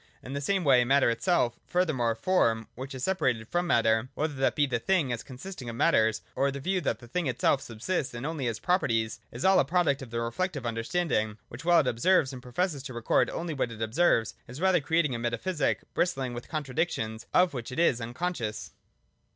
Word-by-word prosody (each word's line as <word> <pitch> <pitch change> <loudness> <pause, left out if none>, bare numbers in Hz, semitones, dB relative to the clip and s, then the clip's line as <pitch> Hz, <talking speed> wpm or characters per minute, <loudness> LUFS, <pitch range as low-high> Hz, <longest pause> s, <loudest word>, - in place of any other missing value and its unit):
In 130 - -7
the 140 - -3
same 190 +5 0
way 130 -5 +5
matter 135 0 +4
itself, 120 0 +1
— - - -42
furthermore 145 -11 +1
form 115 - +1
which 130 +2 -7
is 130 - -6
separated 130 -12 0
from 175 +4 -1
matter, 115 -3 +2
— - - -42
whether 155 0 -1
that 135 -1 +1
be 145 - +3
the 125 -4 -1
thing 160 -4 +1
as 120 - -4
consisting 130 0 -8
of 115 - -6
matters, 110 -1 +2
or 140 - +2
the 140 0 -5
view 185 +5 0
that 125 -7 -1
the 120 +1 -14
thing 165 +6 -2
itself 130 +2 +2
subsists 125 +4 -3
and 120 +3 -5
only 150 -5 -2
has 115 -2 -2
proper 180 +10 +1
ties, 115 +1 -1
— - - -40
is 120 - -5
all 190 0 +6
a - - +5
product 155 -2 +1
of 130 - -8
the 115 +1 -3
reflective 135 +5 -2
understanding 115 -2 -1
which, 120 +6 -9
while 175 0 +5
it 130 - -3
observes 140 +3 +2
and 125 - -8
professes 140 +4 -2
to 130 -2 -8
record 120 - +2
only 165 -1 -4
what 130 -4 -1
it 115 - -9
observes, 115 -1 +2
is 125 +4 -9
rather 185 -2 +3
creating 155 -1 +1
a 115 - -3
metaphysic, 115 - -1
brist 175 -2 +1
ling 130 -2 -3
with 120 0 -8
contradictions 130 -7 -2
of 180 -2 +4
which 125 -1 -5
it 125 - -6
is 130 -8 +3
unconscious. 120 -2 -4
130 Hz, 225 wpm, -28 LUFS, 115-170 Hz, -, all